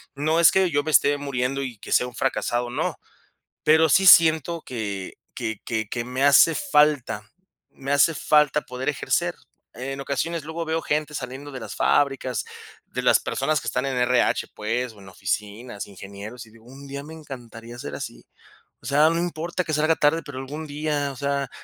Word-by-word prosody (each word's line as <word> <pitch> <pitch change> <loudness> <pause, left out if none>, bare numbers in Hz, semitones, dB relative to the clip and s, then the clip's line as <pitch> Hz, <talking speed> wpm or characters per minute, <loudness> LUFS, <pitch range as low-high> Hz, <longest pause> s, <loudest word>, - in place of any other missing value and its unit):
no 155 +4 +1
es 170 - +7
que 190 -2 +3
yo 145 0 +1
me 155 - -2
esté 145 -1 +4
muriendo 135 -1 -2
y 125 -4 -6
que - - -10
sea 125 - +3
un 125 - -11
fracasado, 120 -2 -1
no. 120 - -2 0.7
Pero 160 +1 +5
sí 190 +6 +4
siento 165 -2 +6
que 100 -6 -5 0.2
que 110 -2 -4
que 110 -3 -2
que 120 0 -3
me 130 +2 -2
hace 145 +3 +6
falta, 150 - +2 0.4
me 135 +1 -6
hace 145 +3 +4
falta 150 0 +3
poder 125 0 -7
ejercer. 145 - -1 0.4
En 135 +3 -5
ocasiones, 150 +4 -2
luego 160 +2 -4
veo 160 +1 -1
gente 150 0 -1
saliendo 140 +1 -6
de 130 - -7
las 115 - -7
fábricas, 135 -5 +1 0.4
de - - -5
las - - +5
personas 150 +3 -1
que - - -8
están 125 +2 -1
en 135 -2 -2
RH, 125 0 +2
pues, 115 +3 -2
o 105 - -17
en 95 -1 -13
oficinas, 105 +3 -4
ingenieros, 100 +5 -9
y 110 - -19
digo, 115 0 -19
un 135 +3 -12
día 140 +1 -6
me 155 +2 -10
encantaría 120 -6 -10
ser - - -6
así. - - -7 0.6
O - - -17
sea, 150 +3 +4
no 165 - 0
importa 175 +1 -2
que 155 - -3
salga 155 +2 +3
tarde, 160 +3 +2
pero 140 -3 -7
algún 145 +4 -6
día, 145 -1 -2
o - - -10
sea, 140 0 -2
140 Hz, 190 wpm, -24 LUFS, 125-155 Hz, 0.7 s, es